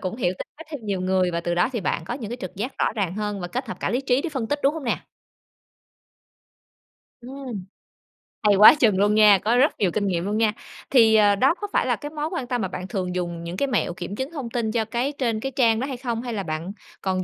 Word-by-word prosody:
cũng 185 Hz, +2 st, -4 dB
hiểu 180 Hz, -8 st, 0 dB
tính -, -, -6 dB
cách 325 Hz, +1 st, -11 dB
thêm 295 Hz, -4 st, -5 dB
nhiều 200 Hz, -3 st, -2 dB
người, 185 Hz, 0 st, +1 dB
và 170 Hz, 0 st, -2 dB
từ 175 Hz, 0 st, -2 dB
đó 175 Hz, -, +2 dB
thì 235 Hz, -, -2 dB
bạn 170 Hz, -3 st, -2 dB
có 195 Hz, -, -4 dB
những 230 Hz, -5 st, -6 dB
cái 240 Hz, -, -4 dB
trực 185 Hz, -1 st, -7 dB
giác 235 Hz, +7 st, -5 dB
rõ -, -, +1 dB
ràng 195 Hz, -5 st, -2 dB
hơn 210 Hz, -1 st, -3 dB
và 175 Hz, -, -5 dB
kết 255 Hz, +7 st, -4 dB
hợp -, -, -6 dB
cả -, -, -1 dB
lý 245 Hz, -, 0 dB
trí 265 Hz, -1 st, +1 dB
để -, -, -2 dB
phân 265 Hz, -7 st, -3 dB
tích, 290 Hz, +5 st, -1 dB
đúng 280 Hz, +3 st, +3 dB
hông 320 Hz, -, -6 dB
nè? 235 Hz, -, +1 dB, 2.2 s
Ừm. 250 Hz, -5 st, -7 dB, 0.8 s
Hay 205 Hz, -1 st, +5 dB
quá 210 Hz, +8 st, +9 dB
chừng 225 Hz, -10 st, +3 dB
luôn 205 Hz, +2 st, +3 dB
nha, 210 Hz, -2 st, +7 dB
có 225 Hz, +6 st, +1 dB
rất 275 Hz, +5 st, +3 dB
nhiều 190 Hz, -4 st, +2 dB
kinh 205 Hz, +3 st, -1 dB
nghiệm 175 Hz, -2 st, -1 dB
luôn 210 Hz, +2 st, -1 dB
nha. 220 Hz, -2 st, +2 dB, 0.4 s
Thì, 225 Hz, -4 st, +6 dB
à, 205 Hz, -2 st, +5 dB
đó 265 Hz, +9 st, +3 dB
có 415 Hz, -, -2 dB
phải -, -, +2 dB
là -, -, +1 dB
cái 295 Hz, -, -7 dB
mối 300 Hz, 0 st, -3 dB
quan 305 Hz, -9 st, -3 dB
tâm 245 Hz, -2 st, -1 dB
mà -, -, -1 dB
bạn 185 Hz, +1 st, -6 dB
thường 185 Hz, -4 st, -3 dB
dùng 175 Hz, -2 st, -3 dB
những 170 Hz, +2 st, -6 dB
cái 280 Hz, -, +1 dB
mẹo 240 Hz, -8 st, 0 dB
kiểm 180 Hz, +3 st, -6 dB
chứng 265 Hz, +6 st, -4 dB
thông 275 Hz, -8 st, -5 dB
tin 230 Hz, -2 st, -1 dB
cho 220 Hz, -1 st, 0 dB
cái 240 Hz, +5 st, -1 dB
trên 230 Hz, -4 st, 0 dB
cái 270 Hz, +4 st, -4 dB
trang 235 Hz, -4 st, +3 dB
đó 265 Hz, -, -2 dB
hay 265 Hz, -, -5 dB
không? 240 Hz, -2 st, -3 dB
Hay 240 Hz, -1 st, -5 dB
là 200 Hz, -3 st, -2 dB
bạn 160 Hz, +2 st, -4 dB, 0.3 s
còn 185 Hz, -1 st, -1 dB
220 Hz, 270 wpm, -24 LUFS, 190-255 Hz, 2.2 s, quá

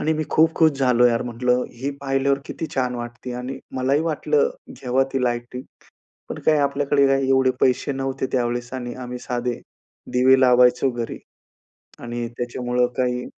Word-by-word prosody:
आणि 160 Hz, -, +1 dB
मी 155 Hz, -, -1 dB
खूप 160 Hz, +1 st, +4 dB
खुश 160 Hz, -1 st, +4 dB
झालो 125 Hz, -2 st, +3 dB
यार 115 Hz, -1 st, +1 dB
म्हंटलं 125 Hz, +1 st, 0 dB, 0.2 s
"ही 140 Hz, +2 st, -1 dB
पाहिल्यावर 135 Hz, 0 st, +1 dB
किती 160 Hz, -, -5 dB
छान 125 Hz, -1 st, 0 dB
वाटते". 120 Hz, +1 st, -7 dB
आणि 125 Hz, +2 st, -5 dB, 0.2 s
मलाही 135 Hz, +3 st, +1 dB
वाटलं 455 Hz, -, +1 dB, 0.3 s
घेवा 130 Hz, +1 st, +1 dB
ती 135 Hz, -1 st, 0 dB
लाईटिंग, 120 Hz, +1 st, -3 dB, 0.7 s
पण -, -, -5 dB
काय 155 Hz, -1 st, +4 dB
आपल्याकडे 140 Hz, 0 st, +2 dB
काय 135 Hz, 0 st, +1 dB
एवढे 130 Hz, -1 st, +3 dB
पैसे 130 Hz, +2 st, +2 dB
नव्हते 135 Hz, 0 st, -3 dB
त्यावेळेस, 120 Hz, 0 st, -1 dB
आणि 120 Hz, -1 st, -5 dB
आम्ही 125 Hz, 0 st, -6 dB
साधे 120 Hz, -1 st, -2 dB, 0.5 s
दिवे 130 Hz, +1 st, +5 dB
लावायचो 125 Hz, +1 st, +4 dB
घरी, 120 Hz, -1 st, -5 dB, 0.8 s
आणि 120 Hz, 0 st, -4 dB
त्याच्यामुळं 125 Hz, 0 st, -1 dB
काही 125 Hz, -1 st, 0 dB
125 Hz, 155 wpm, -22 LUFS, 125-135 Hz, 0.8 s, दिवे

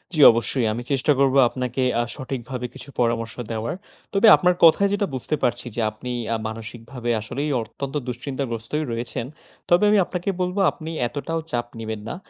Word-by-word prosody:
জি, -, -, -1 dB
অবশ্যই। 115 Hz, +1 st, 0 dB
আমি 120 Hz, +2 st, -4 dB
চেষ্টা 135 Hz, +2 st, +2 dB
করব 135 Hz, -1 st, +3 dB
আপনাকে 125 Hz, 0 st, -3 dB, 0.2 s
আ -, -, +1 dB
সঠিকভাবে 125 Hz, -2 st, -5 dB
কিছু 140 Hz, -, -11 dB
পরামর্শ 115 Hz, -1 st, 0 dB, 0.2 s
দেওয়ার। 115 Hz, +6 st, -2 dB, 0.4 s
তবে 200 Hz, +3 st, +5 dB
আপনার 180 Hz, -1 st, +2 dB
কথায় 195 Hz, +5 st, +6 dB
যেটা 200 Hz, 0 st, +1 dB
বুঝতে 130 Hz, +4 st, -2 dB
পারছি 125 Hz, 0 st, 0 dB
যে 120 Hz, -, -1 dB
আপনি 125 Hz, +3 st, -7 dB, 0.2 s
আ -, -, +1 dB
মানসিকভাবে 115 Hz, +2 st, -6 dB
আসলেই 140 Hz, +7 st, -3 dB
অত্যন্ত 135 Hz, +6 st, -6 dB
দুশ্চিন্তাগ্রস্তই 125 Hz, +2 st, -3 dB
রয়েছেন। 115 Hz, 0 st, -3 dB, 0.4 s
তবে 175 Hz, +3 st, +5 dB
আমি 210 Hz, -, +5 dB
আপনাকে 180 Hz, +2 st, -3 dB
বলব, 180 Hz, +2 st, -1 dB
আপনি 160 Hz, 0 st, -8 dB, 0.2 s
এতটাও 160 Hz, +6 st, -3 dB
চাপ 120 Hz, -1 st, -1 dB
নিবেন 110 Hz, -1 st, -4 dB
না। -, -, -4 dB
125 Hz, 165 wpm, -23 LUFS, 115-150 Hz, 0.4 s, কথায়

